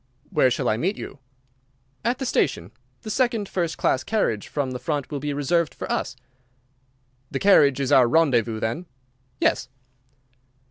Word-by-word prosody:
"Where 150 -7 +4
shall 120 - -1
I 110 - +2
meet 190 - -1
you?" 135 - -8 0.8
"At 240 +2 0
the 265 - -4
station. 115 - 0 0.3
The 215 - -5
second 235 -4 +1
first 170 -4 -2
class 130 - +1
carriage 165 - -1
from 140 -3 -2
the 125 - -5
front 145 +1 -3
will 145 - -3
be 145 +1 -3
reserved 150 +3 0
for - - -5
us." - - -2 1.1
"The - - -3
carriage 145 -9 +5
is 135 -2 -1
our 125 -2 +6
rendezvous, 120 -6 +2
then?" 115 +12 -3 0.5
"Yes." - - +1
145 Hz, 155 wpm, -24 LUFS, 125-180 Hz, 1.1 s, our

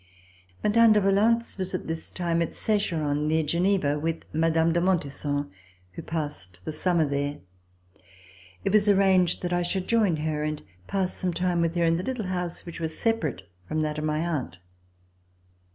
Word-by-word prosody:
Mme. 225 +1 +6
de 210 - +4
Valence 210 +3 +2
was 185 0 -1
at - - -4
this 160 0 -5
time 170 -2 -1
at 170 - -2
Secheron, 155 -9 0
near 160 +1 +2
Geneva, 170 -2 +1
with 165 +1 -3
Mme. 165 +1 +2
de 170 +1 +1
Montesson, 145 - -1 0.4
who 90 - -8
passed 145 - -5
the - - -3
summer 165 +1 +1
there. 145 +1 -2 1.3
It 195 - 0
was 210 -1 +5
arranged 190 -3 +3
that 175 0 -1
I 175 - +2
should 180 +1 -1
join 215 -7 +3
her 155 -1 -2
and 150 0 -3 0.2
pass 190 -2 -1
some 180 -2 -2
time 180 -1 +1
with 165 0 0
her 170 - +2
in 165 0 +2
a - - -3
little 250 -2 -3
house 180 -2 -3
which 170 -1 -8
was 160 -1 -4
separate 165 - -1 0.2
from 155 - -1
that 150 0 -2
of - - -4
my 155 0 0
aunt. 150 - -3
170 Hz, 175 wpm, -26 LUFS, 155-190 Hz, 1.3 s, Mme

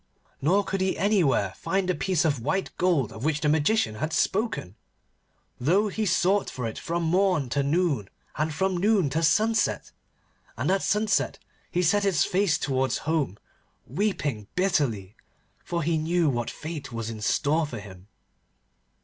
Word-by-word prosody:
Nor 185 +9 +3
could 195 -1 -3
he 190 0 0
anywhere 170 - +2
find 190 -1 -1
the 185 - +2
piece 180 -3 0
of 145 -6 +1
white 190 +10 -2
gold 170 - +2
of 110 - -9
which 150 0 +1
the 150 - +1
Magician 150 - +2
had 155 +8 -3
spoken, 195 - -1 0.8
though 190 - +2
he 215 +2 -2
sought 190 +2 +2
for 125 - -5
it 110 - -4
from 170 +1 -2
morn 180 -5 +2
to 140 +3 +1
noon, 140 - 0 0.3
and 155 +2 -1
from 190 +4 0
noon 195 -6 +2
to 160 +4 0
sunset. 220 +7 +2 0.7
And - - 0
at 195 - +2
sunset 210 0 +1 0.3
he 180 - 0
set 205 +5 +3
his 190 -6 +2
face 185 -4 +2
towards 130 -1 0
home, 150 - 0 0.5
weeping 145 - -2
bitterly, 125 - 0 0.5
for 170 -1 -2
he 160 +1 +1
knew 165 -1 +1
what 120 -2 -2
fate 155 -4 -7
was 115 -1 -4
in 110 -1 -8
store 150 +8 +1
for 120 -6 -6
him. 95 -2 -12
160 Hz, 160 wpm, -26 LUFS, 135-190 Hz, 0.8 s, Nor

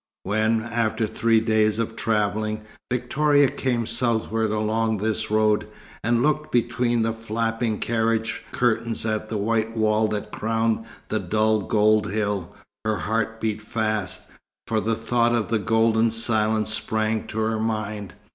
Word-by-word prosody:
When, 110 +3 +1
after 115 -1 0
three 115 +1 +2
days 110 -1 +2
of 115 0 -2
travelling, 110 0 0 0.3
Victoria 145 +3 +3
came 130 -3 -1
southward 110 -2 0
along 110 +1 0
this 110 +2 -1
road, 110 0 +2 0.4
and 120 +1 +2
looked 150 +1 0
between 120 -1 +1
the 115 0 0
flapping 115 0 -2
carriage 115 0 0
curtains 115 -2 0
at 110 -1 -2
the 110 - -2
white 110 +2 0
wall 110 0 +3
that 105 -1 -4
crowned 115 0 0 0.2
the - - 0
dull 110 0 +2
gold 105 +1 +3
hill, 105 -4 -1 0.3
her 110 -1 0
heart 115 +1 -1
beat 110 -1 -2
fast, 110 -3 -2 0.4
for 110 -1 0
the 115 +1 0
thought 120 +1 +1
of 115 -3 -1
the 115 - +1
golden 115 +2 +3
silence 110 -1 0
sprang 110 0 -1
to 110 - -7
her 110 0 0
mind. 110 -3 -3
110 Hz, 145 wpm, -24 LUFS, 110-115 Hz, 0.4 s, Victoria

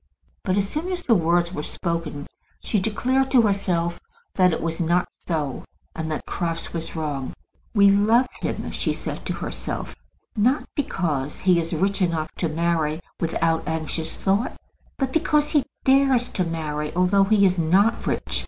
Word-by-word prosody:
But 185 0 0
as 200 -1 +1
soon 325 - -3
as 355 -1 -3
the 235 - +3
words 175 -1 +2
were 150 - -3
spoken 165 -3 -3 0.3
she 210 - 0
declared 255 +7 +1
to 250 -3 +5
herself 180 -5 0 0.3
that 185 -1 +4
it 160 - -1
was 165 0 -3
not 175 +2 +2 0.2
so, 150 -6 -2 0.3
and 160 -1 -3
that 155 - -3
Crofts 165 -1 -3
was 165 0 -5
wrong. 145 -4 -3 0.4
"We 200 -1 +7
love 220 +5 +4 0.2
him," - - -3
she - - -1
said - - -5
to - - -1
herself, - - -5 0.4
"not 245 +7 +2
because 155 - -2
he 180 -2 +4
is 165 0 -3
rich 195 +4 0
enough 165 -3 0
to 165 - 0
marry 160 -1 0 0.2
without 165 0 0
anxious 160 0 -3
thought, 200 +5 0 0.4
but 265 -2 -1
because 300 -2 +2
he 295 -4 +3 0.2
dares 265 -2 +4
to 185 - -1
marry 150 -2 -3
although 185 +2 +4
he 200 0 +4
is 185 -1 +2
not 195 +8 +3
rich." - - -1
175 Hz, 165 wpm, -24 LUFS, 160-210 Hz, 0.4 s, We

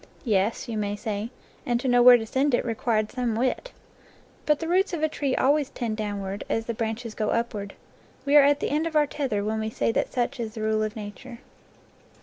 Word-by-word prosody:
"Yes," 210 -1 +1
you 225 -2 -3
may 205 -1 -2
say, 210 0 -4 0.3
"and 240 -1 0
to 260 - -3
know 245 -1 +4
where 245 0 +9
to 225 - -5
send 265 +4 +1
it - - -1
re 230 - -1
quired 215 -1 0
some 245 -3 -1
wit." 255 - -1 0.8
But 300 -1 +3
the 325 - -4
roots 370 +3 +2
of 320 -2 -2
a - - +4
tree 280 -3 -2
always 285 +1 +2
tend 230 -3 -3
downward, 205 -2 -4
as 225 - -1
the 235 - -2
branches 225 +1 -4
go 215 -1 -2
upward. 215 -4 -2 0.5
We 285 +1 +2
are 295 - +10
at 285 +1 +3
the - - -1
end 310 +3 +1
of 325 - -6
our 300 -1 +5
tether 260 -8 -2
when 220 +1 -1
we 220 0 -2
say 220 - 0
that - - -1
such 250 +1 -1
is 225 -1 -4
the 220 - -5
rule 215 0 +1
of 215 +1 -2
nature. 220 +3 -8
235 Hz, 230 wpm, -26 LUFS, 215-270 Hz, 0.8 s, are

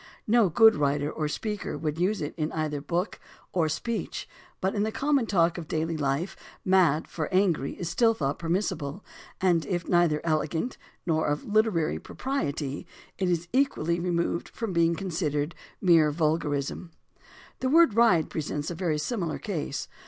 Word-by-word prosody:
No 225 -3 +4
good 220 +6 +6
writer 145 0 0
or 155 - -2
speaker 210 +6 -3
would 155 0 -3
use 190 +1 +1
it 150 - -4
either 155 -1 -1
in 140 - -7
book 175 +6 -2 0.3
or 165 -4 +2
speech, 230 +9 -3 0.3
but 190 +1 0
in 205 - 0
the 215 +1 0
common 275 -1 +1
talk 170 -3 +2
of 160 - -8
daily 160 +1 -1
life 145 +4 -1 0.3
"mad" 180 -5 +3
for 155 +1 -4
angry 180 -7 +2
is 175 - -5
still 225 +3 +3
thought 140 -5 -2
permissible, 165 -2 -2 0.4
and 175 -4 +3
if 175 -3 -2
neither 175 -4 +3
elegant 160 - -1 0.3
nor 160 -2 +1
of 145 0 -1
literary 210 -7 +1
propriety, 145 - -3 0.3
it 185 -2 +1
is 170 -1 0
equally 175 - +1
removed 170 -1 -1
from 225 -5 -4
being 170 0 +3
considered 160 -4 -2 0.3
a - - -7
mere 165 -4 +6
vulgarism. 150 0 -1 0.7
The 260 - 0
word 330 -4 +6
"ride" 205 -8 +4
presents 150 0 -3
a - - -2
very 165 -3 -1
similar 170 +1 -2
case. 155 -8 -4
170 Hz, 160 wpm, -27 LUFS, 155-195 Hz, 0.7 s, good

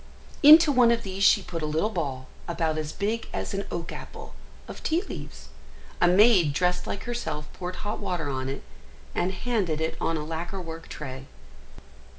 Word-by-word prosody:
Into 310 +1 +9
one 250 -3 +5
of 235 0 +2
these 195 0 -3
she - - +6
put 165 -2 -5
a 155 - -1
little 160 +8 0
ball, 135 -8 -3 0.2
about 160 -2 -1
as 155 -1 -4
big 220 +6 -2
as - - -4
an 195 0 -2
oak 170 -1 -4
apple, - - -9 0.3
of - - -9
tea 330 +4 0
leaves; 145 - -9 0.5
a - - +6
maid 185 -4 +5
dressed 180 +3 0
like 200 - -4
herself 235 -11 -4
poured 180 0 -5
hot 210 - -3
water 180 -6 -2
on 130 -1 -3
it, 135 - -5 0.5
and 180 - 0
handed 190 -6 -1
it 160 0 -1
on 165 - 0
a 150 - -4
lacquer 165 +4 -4
work 165 -2 -8
tray. 130 -2 -7
175 Hz, 180 wpm, -26 LUFS, 155-205 Hz, 0.5 s, Into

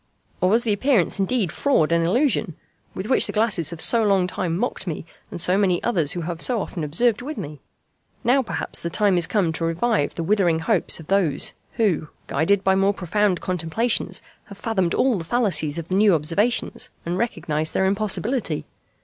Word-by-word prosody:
Or 185 - +3
was 230 +4 +3
the 220 - +1
appearance 215 - +1
indeed 195 -3 0
fraud 175 - +1
and 170 0 +3
illusion, 220 - +1 0.4
with 190 - -4
which 255 - +3
the - - -3
glasses 210 -8 +1
have 170 -1 -6
so 230 +7 +2
long 195 -3 +3
time 180 -2 -2
mocked 240 -2 -3
me 160 -1 -4 0.2
and - - -7
so 185 +3 +3
many 185 -3 +2
others 170 -9 +1
who 175 - -4
have 165 0 -4
so 245 -3 +1
often 175 -4 -5
observed 205 +10 +1
with 300 +5 -6
me? 150 0 -7 0.6
Now 255 +3 +3
perhaps 255 - -4
the 170 - -3
time 200 +1 +2
is 170 -2 +1
come 185 -7 +1
to 165 - -4
revive 165 0 0
the 165 - -3
withering 180 -3 +2
hopes 170 +3 +2
of 160 - -10
those, 180 -6 +1 0.2
who, 200 -9 0 0.2
guided 190 +7 +1
by 190 - +3
more 195 +1 +2
profound 195 +1 0
contemplations, 185 +7 -1 0.2
have 200 - -12
fathomed 190 -7 -1
all 255 -7 +2
the - - -5
fallacies 165 -7 0
of 170 0 -6
the 185 - 0
new 200 -2 +5
observations 170 +10 0 0.2
and 175 +2 -2
recognized 155 -9 -2
their 190 - +2
impossibility! 205 - -1
190 Hz, 190 wpm, -22 LUFS, 165-220 Hz, 0.6 s, new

